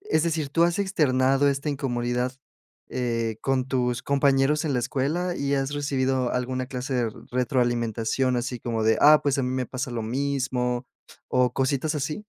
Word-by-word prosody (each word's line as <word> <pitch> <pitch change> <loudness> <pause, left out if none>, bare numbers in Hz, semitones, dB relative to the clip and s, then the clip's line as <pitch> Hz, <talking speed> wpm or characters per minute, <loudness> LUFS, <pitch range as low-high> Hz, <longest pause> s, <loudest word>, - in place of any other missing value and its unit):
es 405 - +1
decir, 160 -3 -1
tú 165 +4 +3
has 175 +2 +1
externado 140 -8 +2
esta 140 +2 -1
incomodidad, 125 -2 -1 0.6
eh, 115 -3 -2
con 130 -1 0
tus 125 -2 -1
compañeros 140 +1 +2
en 150 - 0
la - - +2
escuela, 160 +9 -1
y 140 0 0
has 135 0 -1
recibido 130 -3 0
alguna 130 +1 -2
clase 130 +1 -4
de 125 - +2
r 115 - -1 0.2
retroalimentación? 120 0 0
Así 125 0 -3
como 115 -1 -2
de: 110 0 +3
"Ah, 150 +1 +7
pues 140 -1 +1
a - - +1
mí 125 - -1
me 130 -1 -1
pasa 130 +1 -4
lo 115 -2 -3
mismo". 125 0 -1 0.4
¿O 125 -1 +2
cositas 135 +4 0
así? 150 +8 -3
130 Hz, 175 wpm, -25 LUFS, 125-140 Hz, 0.6 s, Ah